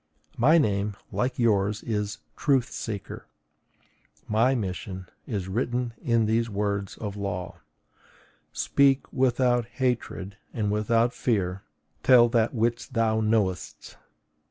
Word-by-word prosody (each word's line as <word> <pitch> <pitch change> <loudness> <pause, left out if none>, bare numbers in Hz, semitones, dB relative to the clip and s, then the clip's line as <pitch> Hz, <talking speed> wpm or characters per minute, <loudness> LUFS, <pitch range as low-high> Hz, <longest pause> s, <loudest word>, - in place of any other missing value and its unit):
My 150 +8 +5
name, 105 -7 +1 0.2
like 125 +2 -1
yours, 105 -3 +1
is 105 -2 -2 0.2
TRUTH 135 -3 +1
SEEKER. 105 -4 -6 1.0
My 115 +5 +3
mission 95 - -4 0.2
is 100 -6 -3
written 120 +3 -1
in 115 -2 +2
these 115 +2 +1
words 100 -1 -2
of 105 -2 -5
the 100 - -9
law: 90 -2 -4 0.9
SPEAK 140 -1 +2
WITHOUT 125 -2 +2
HATRED 120 -6 -2 0.2
AND 105 -3 0
WITHOUT 115 +3 +2
FEAR; 95 -5 -1 0.4
TELL 120 +1 +6
THAT 115 +1 +1
WHICH 120 +2 0
THOU 110 -2 +2
KNOWEST! 105 -6 -1
110 Hz, 115 wpm, -26 LUFS, 100-120 Hz, 1.0 s, TELL